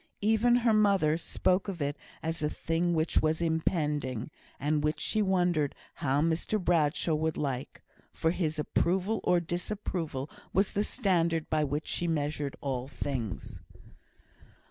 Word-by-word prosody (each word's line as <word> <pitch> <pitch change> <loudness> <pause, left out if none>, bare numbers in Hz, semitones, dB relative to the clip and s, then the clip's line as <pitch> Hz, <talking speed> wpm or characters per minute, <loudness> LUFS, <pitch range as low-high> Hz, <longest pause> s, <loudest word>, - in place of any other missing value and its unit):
Even 220 +3 +4
her 235 -2 +3
mother 200 -7 +4
spoke 185 +3 0
of 190 -4 -4
it 145 0 -1 0.3
as 160 0 -2
a 150 - +1
thing 170 +2 0
which 160 +1 +2
was 155 0 +1
impending, 150 - 0 0.3
and 150 +1 +1
which 150 +1 0
she 215 - 0
wondered 175 -7 +2 0.2
how 140 +1 +1
Mr 165 +6 0
Bradshaw 165 -2 +2
would 160 +1 0
like; 135 -3 -3 0.3
for 160 - +1
his 160 -3 -1
approval 185 +7 +1
or 180 - +4
disapproval 170 -5 -3 0.3
was 195 +2 +2
the 205 - +1
standard 170 - 0
by 155 -1 +3
which 145 +2 -2
she 175 - -1
measured 150 -3 -1
all 130 -2 -2
things. 130 -7 -4
160 Hz, 145 wpm, -30 LUFS, 150-180 Hz, 0.3 s, Even